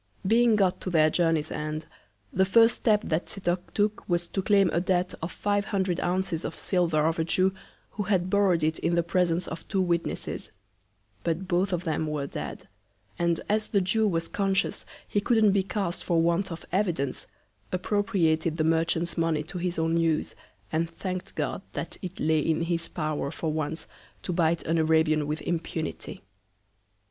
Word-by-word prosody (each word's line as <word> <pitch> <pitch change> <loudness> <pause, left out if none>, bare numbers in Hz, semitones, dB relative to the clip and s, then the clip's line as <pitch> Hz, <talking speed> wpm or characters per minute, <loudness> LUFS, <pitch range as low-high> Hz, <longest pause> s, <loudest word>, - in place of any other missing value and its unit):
Being 230 +2 +4
got 190 -3 +2
to - - -3
their 155 -3 +4
Journey's 165 -3 +1
End, 155 +1 -3 0.5
the 190 - +4
first 225 +4 +5
Step 215 -2 +2
that 160 +2 -1
Setoc 180 -2 -2
took 210 0 0
was 175 0 +1
to 190 +3 -3
claim 200 0 +4
a 170 - +2
Debt 180 0 0
of 165 - -3
five 205 0 0
hundred 190 -3 0
Ounces 175 -2 -1
of - - -4
Silver 170 -5 +1
of 165 +1 +1
a - - +3
Jew, 185 +3 +2 0.4
who 210 - -4
had 185 -2 +1
borrow'd 185 -4 +3
it 160 +1 +1
in 170 - +1
the 170 - +2
Presence 175 0 +1
of 165 +1 -7
two 195 - -1
Witnesses; 175 -2 -1 0.7
but 170 +3 -1
both 185 +2 +1
of 180 -1 -1
them 160 -2 -1
were 150 -2 -2
dead; - - -6 0.5
and 170 -1 +1
as 215 +1 +1
the 200 - +2
Jew 210 +4 +2
was 165 -3 -1
conscious 195 -1 0 0.2
he 205 - 0
couldn't 220 -1 +4
be 195 0 +3
cast 190 -2 -3
for 170 -2 +2
Want 170 +3 +1
of 165 - -7
Evidence, 175 -8 -1 0.4
appropriated 180 -5 +1
the 155 - +1
Merchant's 165 +1 +1
Money 165 -2 +1
to 175 +4 -6
his 175 -1 -2
own 165 +1 +1
Use, 165 -2 +1 0.4
and 165 +1 0
thank'd 185 +2 -5
God - - -2
that - - -5
it 185 -2 -7
lay 160 0 +2
in 160 +2 +1
his 170 0 -1
Power 155 -3 -2
for 155 +1 -3
once 155 +1 -3 0.4
to 180 - -2
bite 165 -1 +2
an 165 +1 +1
Arabian 155 -1 +3
with 150 +1 -2
Impunity. 165 -7 -4
175 Hz, 180 wpm, -27 LUFS, 160-190 Hz, 0.7 s, first